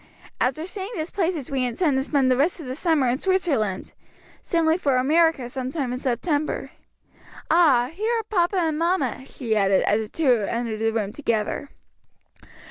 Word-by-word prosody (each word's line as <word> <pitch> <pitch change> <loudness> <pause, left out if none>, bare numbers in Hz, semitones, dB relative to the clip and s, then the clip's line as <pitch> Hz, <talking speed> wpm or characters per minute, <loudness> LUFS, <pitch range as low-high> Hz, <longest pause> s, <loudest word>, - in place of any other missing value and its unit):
After 270 +6 0
seeing 380 +2 -6
these 320 -1 -4
places 335 -8 -2
we 265 -2 0
intend 270 +5 0
to 265 - +1
spend 270 -2 +2
the - - +4
rest 300 +8 +1
of 315 - -8
the 255 0 -5
summer 315 -4 +2
in 245 +2 0
Switzerland, 310 - 0 0.5
sailing 330 0 +1
for 275 -7 +1
America 305 0 +2
some 255 +1 -4
time 265 -4 -3
in 250 - -4
September. 290 +5 -1 0.8
Ah, 290 -7 +4
here 430 +6 -1
are 450 - -2
papa 385 -3 0
and 320 -3 0
mamma!" 330 - 0
she 230 -4 -3
added 195 -2 +3
as 210 +2 +2
the 215 - -6
two 260 -6 +2
entered 230 -2 -2
the 225 0 +1
room 210 -2 -2
together. 235 0 -2
275 Hz, 175 wpm, -24 LUFS, 245-335 Hz, 0.8 s, the